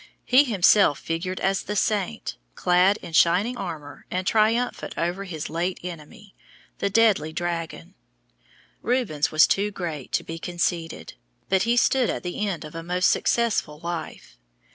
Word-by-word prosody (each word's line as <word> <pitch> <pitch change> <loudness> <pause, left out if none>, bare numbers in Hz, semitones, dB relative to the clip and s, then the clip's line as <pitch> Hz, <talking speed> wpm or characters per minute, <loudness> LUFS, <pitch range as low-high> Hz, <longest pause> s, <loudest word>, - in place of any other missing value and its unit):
He 260 +4 +5
himself 200 - +4
figured 180 +3 -4
as 195 0 +1
the 210 - -5
Saint, 210 +1 -1 0.2
clad 180 +3 +3
in 165 - -9
shining 180 +9 +3
armor 160 -9 -7
and 185 +1 -2
triumphant 225 +4 +1
over 175 +4 -2
his 160 -5 -5
late 175 +3 -2
enemy, 180 +4 -9 0.5
the 200 - 0
deadly 200 -7 +3
dragon. 165 - -4 0.9
Rubens 230 - 0
was 155 0 +6
too 205 +1 +1
great 165 -9 -6
to - - +1
be 165 0 -7
conceited, 170 -1 -3 0.4
but 190 +2 +2
he 240 - +3
stood 255 0 +3
at - - -3
the 180 +4 -3
end 175 -5 -4
of 150 - -10
a 165 - -5
most 180 +2 +2
successful 225 -10 0
life. 170 - -7
180 Hz, 150 wpm, -24 LUFS, 165-210 Hz, 0.9 s, was